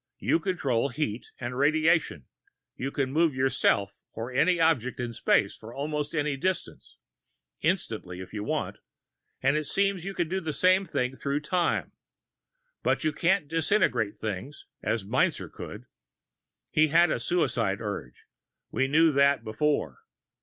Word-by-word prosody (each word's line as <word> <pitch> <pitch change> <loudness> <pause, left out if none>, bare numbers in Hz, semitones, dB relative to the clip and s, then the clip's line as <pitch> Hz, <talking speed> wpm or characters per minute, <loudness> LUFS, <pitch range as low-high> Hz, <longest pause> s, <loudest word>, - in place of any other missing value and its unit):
You 165 - +1
control 140 -9 0
heat 125 -4 -3
and 120 0 -4
radiation, 155 - +2 0.5
you 135 - -3
can 135 -2 -2
move 160 -1 +2
yourself 115 -6 +2 0.2
or 115 +3 -5
any 175 +7 +3
object 145 -8 +2
in 120 -1 -3
space 105 -3 +2
for 110 +1 -11
almost 150 +2 -3
any 150 -2 0
distance, 185 +6 -3 0.6
instantly 115 - -2
if 95 - -9
you 105 -1 -3
want, - - -2 0.6
and 135 +2 +3
it 155 0 0
seems 195 +1 0
you 195 +1 -5
can 175 - 0
do 190 +3 -2
the 160 -3 -3
same 185 +4 +4
through 140 0 -2
time. 175 +3 0 0.9
But - - +1
you 155 -1 +1
can't 170 +1 +1
disintegrate 155 - +1
things, 110 +7 -5 0.2
as 110 -4 -1
Meinzer - - 0
could. - - -9 0.9
He 155 +1 +4
had 165 +2 +4
a - - 0
suicide 120 - 0
urge 100 - -6 0.5
we 135 - +1
knew 160 +3 +5
that 140 0 +3
before. 110 - -1
145 Hz, 145 wpm, -28 LUFS, 120-165 Hz, 0.9 s, knew